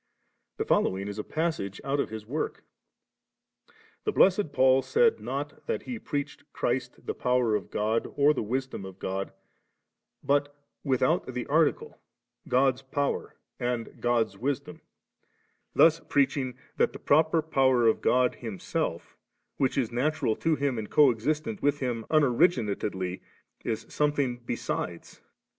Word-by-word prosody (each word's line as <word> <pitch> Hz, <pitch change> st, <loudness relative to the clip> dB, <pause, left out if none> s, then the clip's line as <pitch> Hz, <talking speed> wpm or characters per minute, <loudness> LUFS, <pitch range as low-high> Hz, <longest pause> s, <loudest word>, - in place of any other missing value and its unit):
The -, -, -1 dB
following 95 Hz, +1 st, +1 dB
is 100 Hz, +1 st, -5 dB
a -, -, -2 dB
passage 155 Hz, -, -2 dB
out 140 Hz, +1 st, -1 dB
of -, -, 0 dB
his 110 Hz, -1 st, -7 dB
work*: 145 Hz, +8 st, -3 dB, 1.4 s
'The 425 Hz, -, 0 dB
Blessed 190 Hz, -, +4 dB
Paul 130 Hz, -1 st, +4 dB
said 460 Hz, -, +3 dB
not -, -, -5 dB
that 465 Hz, -, -2 dB
he 245 Hz, -3 st, -5 dB
preached 145 Hz, -5 st, -4 dB
Christ 125 Hz, 0 st, -2 dB
the -, -, -2 dB
power 125 Hz, -3 st, +1 dB
of 105 Hz, -, -1 dB
God 110 Hz, +2 st, -1 dB
or 145 Hz, +1 st, +5 dB
the -, -, -2 dB
wisdom 130 Hz, 0 st, -3 dB
of 95 Hz, -1 st, -9 dB
God, 95 Hz, 0 st, -3 dB, 0.9 s
bu^ 145 Hz, 0 st, +3 dB, 0.4 s
without 140 Hz, +5 st, +1 dB
the 125 Hz, -1 st, -4 dB
article, 155 Hz, +1 st, +1 dB, 0.5 s
•God's 130 Hz, 0 st, +3 dB
power 140 Hz, +1 st, -2 dB, 0.2 s
and 120 Hz, -1 st, -3 dB
God's 120 Hz, -2 st, +1 dB
wisdom^;' 145 Hz, +4 st, -3 dB, 0.9 s
thus 165 Hz, 0 st, +6 dB
preaching 135 Hz, -4 st, 0 dB, 0.2 s
that -, -, +2 dB
the -, -, -7 dB
proper 160 Hz, +2 st, +3 dB
power 130 Hz, -5 st, +3 dB
of 110 Hz, -, +3 dB
God 125 Hz, 0 st, +3 dB
Him 110 Hz, -5 st, -7 dB
self -, -, -3 dB, 0.4 s
which 135 Hz, -1 st, +1 dB
is 125 Hz, -4 st, 0 dB
natural 135 Hz, -1 st, 0 dB
to 160 Hz, -1 st, +1 dB
Him 140 Hz, -5 st, -1 dB
and 105 Hz, -, -6 dB
co*existent 150 Hz, -, +2 dB
with 145 Hz, 0 st, +1 dB
Him 120 Hz, -4 st, -3 dB
unoriginatedly, 115 Hz, -, +1 dB, 0.4 s
is 110 Hz, -, -3 dB
something 145 Hz, -4 st, 0 dB
be 120 Hz, 0 st, -3 dB
sides.' 85 Hz, -6 st, -5 dB
130 Hz, 140 wpm, -28 LUFS, 115-150 Hz, 1.4 s, thus